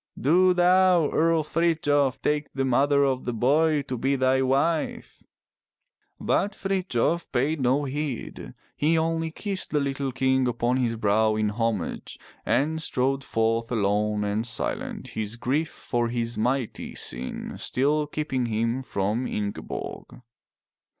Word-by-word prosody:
Do 180 +6 +4
thou. 180 -2 +4
Earl 165 0 +2
Frithjof, 150 -5 +1
take 150 0 -1
the 135 -1 -1
mother 140 +3 +3
of 130 -2 0
the 125 - -2
boy 145 +5 +2
to 125 -3 -5
be 135 +3 +1
thy 130 0 +2
wife!" 140 +5 0 1.0
But 205 0 0
Frithjof 180 -5 -1
paid 140 +4 0
no 130 +3 +2
heed. 140 -2 -5 0.2
He 160 +3 +2
only 165 0 0
kissed 195 +3 -3
the 150 - +1
little 140 -1 -2
king 130 0 +1
upon 120 +1 0
his 120 -3 0
brow 110 0 +2
in 110 -1 +1
homage, 110 -4 -3 0.3
and 160 +3 +1
strode 135 -2 0
forth 115 0 0
alone 105 -1 +1
and 105 +2 -1
silent, 115 - -3
his 110 0 -4
grief 145 +7 -1
for 120 -4 -2
his 115 0 -2
mighty 125 +1 -2
sin 60 +2 -5
still 150 +3 0
keeping 140 -5 -2
him 115 +3 -1
from 110 +1 -1
Ingeborg. 105 +4 -5
130 Hz, 135 wpm, -25 LUFS, 115-155 Hz, 1.0 s, Do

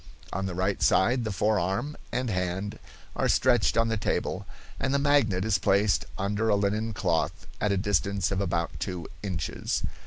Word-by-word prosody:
On 95 +1 -2
the 90 - -4
right 95 +2 0
side 120 +5 +3
the 110 - -1
forearm 105 +6 0 0.2
and 125 -2 -1
hand 95 +3 -2 0.4
are - - +1
stretched 120 -4 +3
on 115 0 +4
the 110 -1 0
table, 100 - -2 0.3
and 135 +1 0
the - - +5
magnet 140 -10 +3
is 105 -4 +2
placed 100 - +2
under 105 +3 0
a 105 - +4
linen 105 +3 0
cloth 85 -5 -1 0.2
at 105 - +2
a 100 - +2
distance 100 -1 +1
of 100 0 0
about 85 -4 -1
two 90 -3 -4
inches. 95 -4 -2
100 Hz, 175 wpm, -27 LUFS, 95-110 Hz, 0.4 s, the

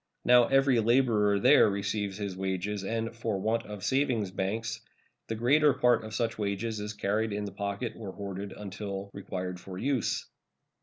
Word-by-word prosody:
Now 125 -1 +6
every 135 -2 +4
laborer 110 -4 +3
there 105 - +6
receives 100 0 -2
his 100 -3 -4
wages, 95 +2 -2
and, 115 +3 -2
for 115 -4 -2
want 110 +3 0
of 105 -2 -8
savings 125 -8 +1
banks, 110 +4 -3 0.5
the 115 - -2
greater 140 +6 +4
part 120 -2 +3
of 110 0 -7
such 115 -1 -1
wages 105 +2 -2
is 105 +1 -4
carried 105 +2 -1
in 105 0 -2
the 100 - -5
pocket 100 +3 -3
or 105 -4 -7
hoarded 100 0 -6
until 100 -1 -6
required 90 -2 -5
for 90 0 -9
use. 130 +2 0
105 Hz, 165 wpm, -29 LUFS, 100-115 Hz, 0.5 s, Now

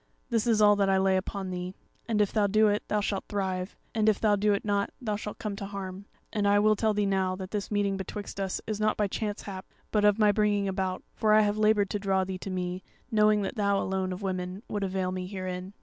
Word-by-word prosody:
This 230 0 +1
is 220 -2 +4
all 205 0 +7
that 200 -1 +2
I 190 - +4
lay 190 0 +3
upon 190 0 -3
thee; 180 +1 -5 0.3
and 215 -3 +2
if 205 - +1
thou 210 -2 +3
do 215 +2 +4
it, 205 0 +1
thou 210 - +1
shalt 200 -1 -2
thrive, 190 -2 -2 0.2
and 220 -2 +3
if 210 - +1
thou 210 -2 +3
do 205 +1 +2
it 200 - 0
not, 200 -1 +1
thou 215 -4 -2
shalt 210 0 -6
come 210 -2 -4
to 200 -1 -5
harm. 195 -1 -6 0.3
And 205 -2 +1
I 205 0 +5
will 215 +1 +4
tell 215 0 +1
thee 205 0 +1
now 190 -1 +1
that 185 0 -7
this 205 -2 -3
meeting 205 -2 0
betwixt 200 +1 -6
us 195 -1 -1
is 215 -1 -3
not 215 0 +1
by 210 - +2
chance 205 +1 -3
hap, 190 -2 -7 0.2
but 210 -1 +2
of 210 0 +5
my 210 -2 +5
bringing 205 -1 +1
about; 190 -1 -2
for 215 -1 +2
I 215 - +7
have 205 -1 +1
laboured 210 -2 +3
to 205 - -1
draw 195 -1 +1
thee 185 0 -5
to 195 - -6
me, 180 0 -3 0.3
knowing 210 -1 +4
that - - -3
thou 200 -1 +2
alone 190 -1 -1
of 185 +2 -6
women 185 +1 -3
would 205 -1 -2
avail 190 -1 -1
me 185 0 -4
herein. 185 -1 -5
200 Hz, 255 wpm, -28 LUFS, 190-210 Hz, 0.3 s, all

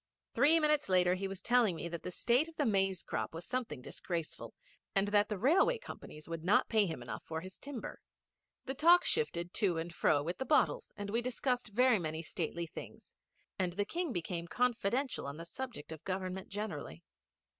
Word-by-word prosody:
Three 295 +7 +5
minutes 300 -5 +2
later 180 -1 +4
he 190 +1 -2
was 190 -1 -7
telling 240 -7 +4
me 165 - -4
that 170 -1 -5
the - - -5
state 245 - +2
of 330 - -12
the 295 - +1
maize 195 -3 +1
crop - - -3
was 165 - -6
something 245 - -3
disgraceful, 165 +1 -5 0.4
and 195 +1 +3
that 205 0 +3
the 210 - -2
Railway 345 - +4
companies 155 - -10
would 165 -1 -5
not 195 +4 +4
pay 215 -3 +4
him 160 -7 -5
enough 120 - -6
for 160 0 -4
his 185 +1 -10
timber. 280 -5 -6 0.7
The 265 - -2
talk 340 +5 +6
shifted 175 - 0
to 185 -5 +2
and 165 +1 -4
fro 145 -2 +3
with 170 +4 -4
the - - 0
bottles, 300 - +2
and 205 -1 -4
we 230 +2 +2
discussed 250 0 -1
very 240 +1 +4
many 160 -1 -3
stately 170 +1 -3
things, 160 - -10 0.5
and 180 -2 0
the 205 +3 0
King 340 - -2
became 170 -3 -3
confidential 250 - 0
on 140 +1 -6
the 165 - -7
subject 245 - -6
of 160 -2 -8
Government 185 0 -3
generally. 180 - -5
195 Hz, 195 wpm, -34 LUFS, 170-250 Hz, 0.7 s, talk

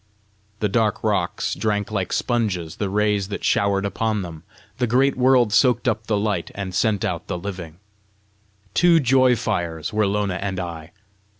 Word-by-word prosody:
The 105 - +2
dark 110 +1 0
rocks 100 -5 0
drank 105 -1 -1
like 95 -4 -2
sponges 100 -9 -1
the 100 - -2
rays 105 -1 +1
that 100 - -6
showered 100 -1 +1
upon 105 0 -1
them; 80 -3 -8 0.4
the 125 - +1
great 130 +4 +3
world 125 -4 +3
soaked 125 +1 +3
up 110 -2 -1
the 105 - +1
light, 100 -4 -1
and 95 -2 -5
sent 105 +1 +1
out 85 -2 -3
the 90 - -3
living. 90 -3 -7 1.0
Two 175 -2 +5
joy 130 -2 +4
fires 85 -8 -3
were 105 -1 +2
Lona 100 -2 -1
and 95 -2 -3
I. 85 -3 -6
105 Hz, 165 wpm, -22 LUFS, 95-115 Hz, 1.0 s, Two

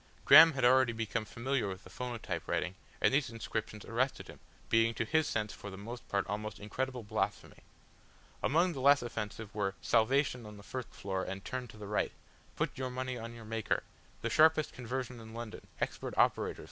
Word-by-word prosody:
Graham 165 -1 +10
had 135 -3 +1
already 130 -1 +5
become 110 0 -2
familiar 125 +2 -1
with 95 -1 -6
the 95 - -14
phonotype 110 -8 -4
writing 90 +1 0 0.3
and - - +3
these 140 0 +2
inscriptions 110 -2 -4
arrested 130 +4 -1
him, - - -11 0.3
being 115 0 +3
to 115 - -1
his 155 +6 +2
sense 105 -1 -1
for 100 - -8
the 95 - -8
most 115 +5 -8
part 100 - +1
almost 105 +2 -4
incredible 125 +4 -3
blasphemy. 110 +1 -2 0.8
Among 170 +5 +3
the 140 - -5
less 140 0 +6
offensive 110 -2 -5
were 100 -2 -1
"Salvation 125 +2 +2
on 105 0 -10
the 100 - -12
First 130 +2 -5
Floor 95 -1 -3
and 95 +1 -6
turn 130 -1 -4
to 110 - -13
the 105 - -8
Right." 105 +1 0 0.4
"Put - - -2
your 130 -1 -2
Money 130 0 -3
on 115 +1 -7
your 115 -1 -10
Maker." 110 0 -1 0.4
"The - - -1
Sharpest 155 0 +5
Conversion 125 0 -4
in 110 0 -10
London, 115 -2 -7
Expert - - -3
Operators! - - +2
115 Hz, 190 wpm, -33 LUFS, 105-130 Hz, 0.8 s, Graham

